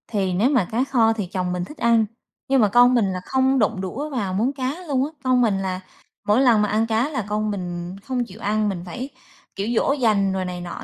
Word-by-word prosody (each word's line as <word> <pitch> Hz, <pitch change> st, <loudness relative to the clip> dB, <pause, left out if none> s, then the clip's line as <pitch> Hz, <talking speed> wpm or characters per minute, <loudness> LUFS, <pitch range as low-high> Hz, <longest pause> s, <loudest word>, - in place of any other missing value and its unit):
Thì 195 Hz, -4 st, -1 dB
nếu 210 Hz, +8 st, +2 dB
mà 255 Hz, -10 st, +2 dB
cá 235 Hz, +3 st, +1 dB
kho 235 Hz, -5 st, +3 dB
thì 215 Hz, -3 st, -3 dB
chồng 180 Hz, 0 st, -2 dB
mình 180 Hz, 0 st, -2 dB
thích 300 Hz, -, -12 dB
ăn, 230 Hz, -1 st, +3 dB, 0.4 s
nhưng 270 Hz, -1 st, +3 dB
mà 210 Hz, -, +5 dB
con 245 Hz, +4 st, +6 dB
mình 235 Hz, -4 st, +3 dB
là 185 Hz, -, -3 dB
không 265 Hz, 0 st, +2 dB
đụng 205 Hz, -3 st, +1 dB
đũa 260 Hz, +11 st, -4 dB
vào 215 Hz, -10 st, -2 dB
món 230 Hz, +8 st, 0 dB
cá 265 Hz, 0 st, -3 dB
luôn 270 Hz, -2 st, +1 dB
á. 300 Hz, -, -7 dB
Con 255 Hz, -1 st, +3 dB
mình 215 Hz, -5 st, +2 dB
là 185 Hz, -1 st, -3 dB, 0.5 s
mỗi 210 Hz, +5 st, +4 dB
lần 235 Hz, -5 st, +5 dB
mà 210 Hz, -, +2 dB
ăn 220 Hz, +2 st, +1 dB
cá 225 Hz, +5 st, +1 dB
là 265 Hz, -9 st, -3 dB
con 210 Hz, 0 st, -1 dB
mình 175 Hz, -2 st, -5 dB
không 255 Hz, -1 st, -1 dB
chịu 215 Hz, 0 st, -13 dB
ăn, 215 Hz, 0 st, +1 dB
mình 180 Hz, -3 st, -4 dB
phải, 245 Hz, +10 st, -6 dB, 0.5 s
kiểu, 200 Hz, +2 st, -3 dB
dỗ 275 Hz, -, +2 dB
dành 210 Hz, -8 st, +2 dB
rồi 190 Hz, -1 st, -2 dB
này 180 Hz, -1 st, -5 dB
nọ 175 Hz, -1 st, -7 dB
220 Hz, 250 wpm, -22 LUFS, 190-255 Hz, 0.5 s, con